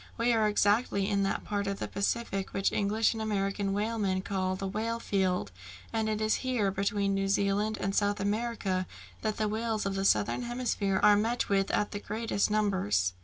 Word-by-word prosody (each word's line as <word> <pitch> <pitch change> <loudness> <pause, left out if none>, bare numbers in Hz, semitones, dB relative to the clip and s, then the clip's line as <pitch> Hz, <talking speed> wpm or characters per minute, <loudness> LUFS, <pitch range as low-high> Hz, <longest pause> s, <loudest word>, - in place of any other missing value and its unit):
"We 235 +1 +2
are 220 -2 +3
exactly 205 -1 +2
in 200 -1 +1
that 195 - -1
part 200 -1 -2
of 200 0 -2
the - - -4
Pacific 200 -1 -2
which 195 - +1
English 215 +3 +1
and 225 - -5
American 200 -2 -1
whalemen 205 -2 -1
call 185 -1 -1
the 195 +1 -4
whale 225 +4 -2
field, 185 - 0 0.4
and 220 -1 0
it 215 -1 -1
is 215 0 +2
here, 245 -7 0
between 200 0 0
New 195 0 0
Zealand 200 +2 +1
and 195 - -1
South 205 0 +1
America, 205 -3 -1 0.3
that 215 -1 -1
the 215 - +1
whales 220 0 -1
of 195 - -1
the 195 0 -1
southern 200 +4 +2
hemisphere 240 -5 -1
are 210 0 +7
met 225 +4 0
with 195 -1 +2
in 210 - +2
the 205 - -4
greatest 215 0 -1
numbers." 185 - +1
205 Hz, 190 wpm, -30 LUFS, 195-220 Hz, 0.4 s, are